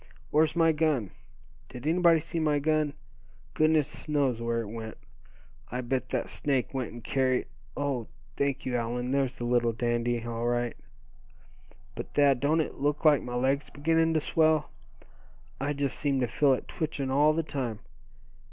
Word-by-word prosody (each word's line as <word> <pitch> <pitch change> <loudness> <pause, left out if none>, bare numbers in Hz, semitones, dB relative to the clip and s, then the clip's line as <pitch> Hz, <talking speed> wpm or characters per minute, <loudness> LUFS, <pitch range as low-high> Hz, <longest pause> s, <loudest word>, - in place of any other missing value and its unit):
Where's 155 +1 +3
my 165 -1 +4
gun? 150 - 0 0.6
Did 125 +2 -9
anybody 170 0 +4
see 165 +1 -3
my 150 -2 +2
gun? 155 0 +1 0.6
Goodness 155 -1 +1
knows 135 -6 +1
where 115 0 0
it 115 - -6
went. 110 -1 -7 0.7
I 125 +1 -3
bet 125 0 -2
that - - -1
snake 135 -3 -1
went 130 -3 -3
and 120 -1 -10
carried 130 0 +1 0.3
oh! 140 -5 -1 0.3
thank 140 -1 -1
you, 125 - -1
Allan, 120 +2 -2
there's 135 -2 0
the 120 - -4
little 120 -1 +2
dandy, 120 0 -1
all 115 0 -2
right. 120 0 0 1.2
But - - -8
Thad, 140 -3 +4
don't 150 +4 +2
it 155 - -5
look 145 +3 -1
like 150 -3 +6
my 125 0 -5
leg's 135 +3 0
beginning 165 +2 +1
to - - +4
swell? 155 0 +2 0.9
I 140 +2 -1
just 140 -2 -2
seem 140 -2 +1
to 125 - +1
feel 135 +4 +3
it 130 - -3
twitching 150 -5 -3
all 150 +3 +4
the 165 +1 0
time. 130 -8 -3
140 Hz, 165 wpm, -28 LUFS, 120-150 Hz, 1.2 s, like